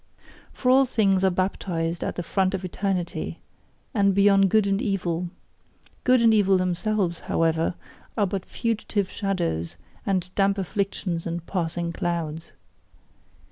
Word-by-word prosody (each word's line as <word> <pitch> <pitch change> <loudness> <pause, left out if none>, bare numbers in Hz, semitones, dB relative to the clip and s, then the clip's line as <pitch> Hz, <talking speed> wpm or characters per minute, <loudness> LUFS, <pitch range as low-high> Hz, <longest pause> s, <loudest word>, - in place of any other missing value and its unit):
For 250 - +1
all 270 +1 +6
things 195 -6 +2
are 190 - +5
baptized 175 -2 -2
at - - -3
the 175 - -3
font 190 +2 +1
of 190 0 -4
eternity, 185 -1 -2 0.6
and 200 -4 +3
beyond 195 -1 +5
good 215 +1 +4
and 195 +1 +1
evil; 180 -6 -1 0.7
good 255 -2 +4
and 225 -1 +6
evil 195 -3 +4
themselves, 185 0 0
however, 165 +1 0 0.4
are 205 - +3
but 195 -1 -3
fugitive 215 -3 -2
shadows 170 - -2 0.3
and 185 -2 -1
damp 200 0 +2
afflictions 190 -3 -2
and 170 0 -4
passing 170 -2 -2
clouds. 165 -2 -3
190 Hz, 135 wpm, -25 LUFS, 170-200 Hz, 0.7 s, all